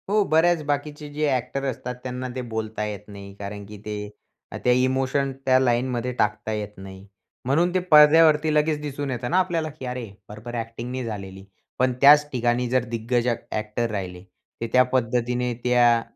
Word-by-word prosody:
हो, 210 +1 +3
बऱ्याच 165 +1 +3
बाकीचे 145 +1 -3
जे 150 +1 0
ॲक्टर 130 +1 -2
असतात, 125 0 -5
त्यांना 125 0 -4
ते 130 - -3
बोलता 110 -1 -3
येत 105 -2 -5
नाही 100 -1 -10
कारण 100 0 -6
की 105 +1 -10
ते 105 -1 -5 0.5
त्या 125 - +4
इमोशन, 130 +2 +1
त्या 130 -1 +5
लाईनमध्ये 125 -1 0
टाकता 105 -2 -1
येत 105 -1 -5
नाही. 95 0 -11 0.4
म्हणून 165 +7 +2
ते 185 - +2
पडद्यावरती 155 0 +6
लगेच 150 0 +2
दिसून 145 -1 -4
येतं 120 -1 -3
ना 180 - +3
आपल्याला, 170 -4 0
की 145 -3 -10
अरे 125 -3 -5 0.2
बरोबर 110 +3 -8
ॲक्टिंग 115 +1 -5
नाही 130 0 -3
झालेली. 95 -4 -7 0.4
पण 130 0 +2
त्याच 150 +1 +7
ठिकाणी 120 0 0
जर 130 0 +2
दिग्गज 120 +1 -1 0.2
ॲक्टर 110 +2 -2
राहिले, 90 -3 -5 0.4
ते 115 - -1
त्या 130 - +7
पद्धतीने 125 0 0
त्या 120 -1 +4
125 Hz, 170 wpm, -24 LUFS, 110-145 Hz, 0.5 s, त्याच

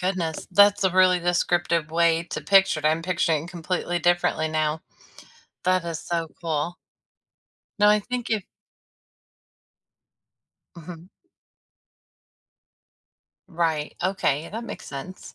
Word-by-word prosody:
goodness. 180 -4 -2
That's 205 +1 +5
a 190 - +4
really 185 0 +4
descriptive 175 -2 0
way 165 0 +2
to - - -3
picture 195 -5 +4
it. - - -16
I'm 160 +2 +1
picturing 165 -3 0
completely 175 0 -3
differently 175 -2 +1
now. 155 0 -1 0.9
That 185 -1 +2
is 165 -2 -4
so 165 -1 -3
cool. 165 +1 -2 1.0
No. 210 0 +5
I 210 0 +4
think 245 +2 -5
if 215 -4 0 2.3
Mhm. 170 +1 -10 2.4
Right. 160 -3 -1
Okay, 170 -5 0
that 225 +3 -6
makes - - -8
sense. 145 +7 -9
175 Hz, 110 wpm, -24 LUFS, 160-185 Hz, 2.4 s, That's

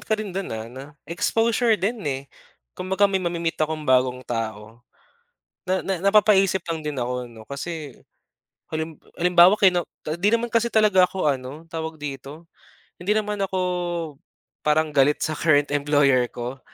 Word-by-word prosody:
ka 220 - -1
rin 215 -3 -5
do'n, 195 +1 -4
ah, 110 0 -5
'no 130 +2 -9 0.2
exposure 225 +6 +1
din 220 +4 -2
eh, 135 -1 -3 0.5
kumbaga 190 +2 0
may 195 -1 +2
ma-me-meet 170 -2 -2
akong 155 0 -1
bagong 130 -1 +2
tao. 115 -1 -5 0.9
Na 185 0 0
na 195 - -2
napapaisip 195 -1 +4
lang 160 -2 -3
din 150 -3 -3
ako 125 +1 -3
ano 115 -1 -13
kasi, 145 -1 -6 0.8
halim 160 0 -3 0.2
halimbawa 175 +1 +6
kino 180 -4 +4 0.2
ah, 155 - -2
'di 185 +4 +1
naman 235 +1 +1
kasi 235 0 0
talaga 210 -4 +5
ako 180 -3 -1
ano, 140 +4 -4
tawag 160 -1 -6
dito? 145 +3 -8 0.5
Hindi 205 +4 +1
naman 210 -1 -1
ako 190 -1 -1 1.0
parang 155 0 +1
galit 145 +1 +3
sa 155 - -1
current 145 -2 +2
employer 140 -3 +3
ko, 125 +3 -6
160 Hz, 155 wpm, -23 LUFS, 140-190 Hz, 1.0 s, halimbawa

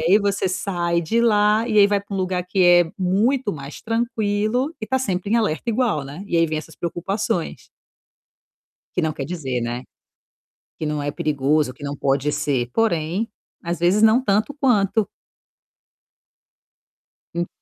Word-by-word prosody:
aí 185 +5 +5
você 200 -2 0
sai 175 -3 -1
de 225 +8 0
lá 215 0 +3
e 215 - 0
aí 200 - +8
vai 205 -1 +1
para 200 0 -8
um - - -2
lugar 185 -1 -1
que 185 +1 +1
é 175 -1 +5
muito 205 +6 +1
mais 140 -1 -8
tranquilo 225 +3 0
e 220 - -4
tá 260 +2 +1
sempre 195 -5 -2
em 230 - +4
alerta 220 -1 -1
igual, 220 - 0
né. 145 +7 -8
E 170 - -1
aí 165 0 +4
vem 155 -1 -3
essas 155 0 -10
preocupações. 180 +3 -3 1.3
Que 180 - 0
não 160 -1 0
quer 140 - -5
dizer, 135 -6 -3
né. 120 +1 -3 1.0
Que 155 - -3
não 150 -1 -2
é 145 - -1
perigoso, 145 -1 0
que 145 - -11
não 145 0 -4
pode 140 +1 0
ser. 135 -5 -1
Porém, 185 -1 0 0.3
às 170 0 -3
vezes 180 +5 +3
não 220 +3 +5
tanto 215 +6 +1
quanto. 220 -6 +2 2.3
Hum 175 0 -1
185 Hz, 165 wpm, -22 LUFS, 155-215 Hz, 2.3 s, aí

